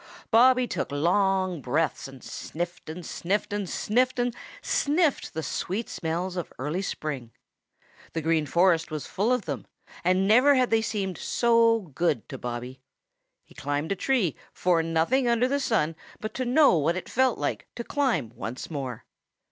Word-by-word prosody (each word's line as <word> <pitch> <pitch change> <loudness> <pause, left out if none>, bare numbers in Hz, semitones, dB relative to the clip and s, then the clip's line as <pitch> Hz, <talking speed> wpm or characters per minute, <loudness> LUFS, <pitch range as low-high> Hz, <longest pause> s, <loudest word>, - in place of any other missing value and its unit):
Bobby 250 +2 +6
took - - -3
long 185 +3 +1
breaths 150 +4 -1
and 135 -2 -13
sniffed 175 0 -6
and 165 +2 -7
sniffed 200 +3 -2
and 205 -3 -2
sniffed 250 +4 +1
and 245 0 0 0.3
sniffed 300 - +1
the 160 - -2
sweet 190 - -3
smells 175 +2 -3
of 175 - -4
early 150 +8 -2
spring. 145 -10 -4 0.8
The 160 - -2
Green 160 -1 +1
Forest 170 +1 +3
was 155 -2 -4
full 205 +6 0
of 250 -5 +1
them, - - -5 0.4
and 185 +2 +3
never 255 +7 +6
had 255 -1 +2
they 225 0 +4
seemed 195 -5 -3
so 230 -1 +3
good 150 -6 0
to - - -7
Bobby. 125 +2 -6 0.6
He - - -19
climbed 145 +4 -2
a - - +2
tree 215 - +1 0.2
for 175 -2 +2
nothing 165 +11 +1
under 235 +1 +3
the 280 +2 0
sun 165 - +1 0.2
but 215 - -5
to 255 - -2
know 255 - +5
what 165 +4 +1
it 185 - -6
felt 260 0 +2
like - - -3
to 235 - -4
climb 260 - 0
once 125 +8 -6
more. 130 -6 -5
185 Hz, 165 wpm, -27 LUFS, 160-235 Hz, 0.8 s, Bobby